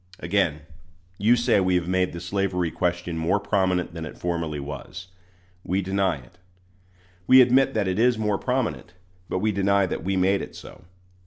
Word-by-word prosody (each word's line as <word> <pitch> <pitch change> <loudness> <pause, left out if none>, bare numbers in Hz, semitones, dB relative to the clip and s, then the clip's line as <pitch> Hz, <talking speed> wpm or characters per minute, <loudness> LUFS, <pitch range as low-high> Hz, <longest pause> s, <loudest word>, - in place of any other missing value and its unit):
Again, 85 -7 0 0.6
you 110 +4 +4
say 120 -3 +2
we 95 -1 +2
have 90 -1 0
made 95 0 +1
the 85 - -7
slavery 90 -1 -1
question 85 -1 -2
more 85 +5 +1
prominent 95 -4 0
than 85 -1 -6
it 80 - -8
formerly 85 -4 -3
was. 75 +6 -8 0.5
We 95 +2 -1
deny 95 -1 0
it. 65 +6 -18 0.9
We 130 - +8
admit 130 +1 +4
that 105 -3 +1
it 95 +2 -1
is 120 0 +3
more 105 -2 0
prominent, 125 -8 -2 0.3
but - - -1
we 105 +3 +1
deny 100 0 +2
that 90 - -4
we 95 +2 -1
made 95 +2 +2
it - - -8
so. - - -12
95 Hz, 175 wpm, -24 LUFS, 85-100 Hz, 0.9 s, We